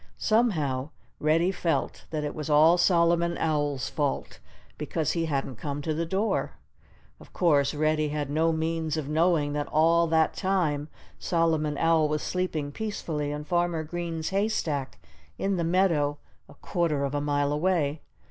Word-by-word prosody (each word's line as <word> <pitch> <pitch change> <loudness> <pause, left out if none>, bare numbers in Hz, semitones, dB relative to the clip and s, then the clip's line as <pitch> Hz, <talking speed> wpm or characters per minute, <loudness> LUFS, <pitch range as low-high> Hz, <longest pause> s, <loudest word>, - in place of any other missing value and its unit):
Somehow, 155 - +1 0.3
Reddy 165 +4 +2
felt 165 -7 -2
that 155 -2 -3
it 150 - -3
was 155 -1 -5
all 160 +4 +5
Solomon 170 -1 +3
Owl's 145 -4 -1
fault, 145 -2 -2 0.4
because 160 -3 -1
he 165 -1 -1
hadn't 135 -4 -2
come 145 +2 -4
to 155 - -1
the 165 +2 -2
door. 195 +6 -1 0.7
Of - - -17
course, 150 -5 +2
Reddy 155 0 +1
had 145 -1 -2
no 160 +3 +1
means 160 -1 -1
of 150 -3 -3
knowing 155 -1 +2
that 145 0 -2
all 165 +2 +3
that 160 -1 +2
time 165 -7 0 0.3
Solomon 160 -3 0
Owl 165 -1 +3
was 150 0 -1
sleeping 165 -6 -2
peacefully 155 -7 -3
in 150 0 -4
Farmer 175 0 0
Green's 165 0 -4
haystack 180 -9 -1 0.4
in 195 -1 0
the 170 - 0
meadow, 165 -5 +2 0.3
a - - -14
quarter 165 -6 -1
of 140 0 -2
a 145 - 0
mile 145 0 0
away. 155 -2 0
160 Hz, 155 wpm, -27 LUFS, 145-170 Hz, 0.7 s, all